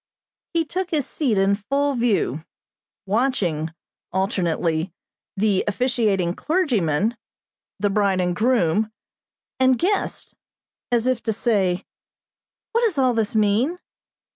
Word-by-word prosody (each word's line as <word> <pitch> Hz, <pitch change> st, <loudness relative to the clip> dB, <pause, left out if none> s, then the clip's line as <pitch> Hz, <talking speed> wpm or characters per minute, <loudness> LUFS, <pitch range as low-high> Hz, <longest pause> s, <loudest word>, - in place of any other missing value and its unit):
He 330 Hz, -1 st, +2 dB
took 365 Hz, +3 st, -3 dB
his 300 Hz, -6 st, 0 dB
seat 255 Hz, -9 st, 0 dB
in 195 Hz, +1 st, +3 dB
full 275 Hz, +8 st, 0 dB
view, 220 Hz, -, 0 dB, 0.6 s
watching, 195 Hz, -, 0 dB, 0.4 s
alternately, 175 Hz, -3 st, 0 dB, 0.5 s
the 200 Hz, -1 st, +2 dB
officiating 210 Hz, -6 st, +1 dB
clergyman, 230 Hz, -, +1 dB, 0.6 s
the 205 Hz, 0 st, +1 dB
bride 195 Hz, -2 st, +2 dB
and 180 Hz, -1 st, 0 dB
groom, 215 Hz, -2 st, +2 dB, 0.7 s
and 260 Hz, -1 st, +4 dB
guests, 390 Hz, -, -1 dB, 0.6 s
as 235 Hz, -1 st, +2 dB
if 255 Hz, -2 st, +1 dB
to 225 Hz, -, -1 dB
say: 200 Hz, -5 st, 0 dB, 0.9 s
"What 465 Hz, -, +2 dB
does 435 Hz, -10 st, +1 dB
all 255 Hz, -2 st, +3 dB
this 225 Hz, -1 st, -1 dB
mean?" 220 Hz, -, +2 dB
215 Hz, 115 wpm, -23 LUFS, 190-260 Hz, 0.9 s, and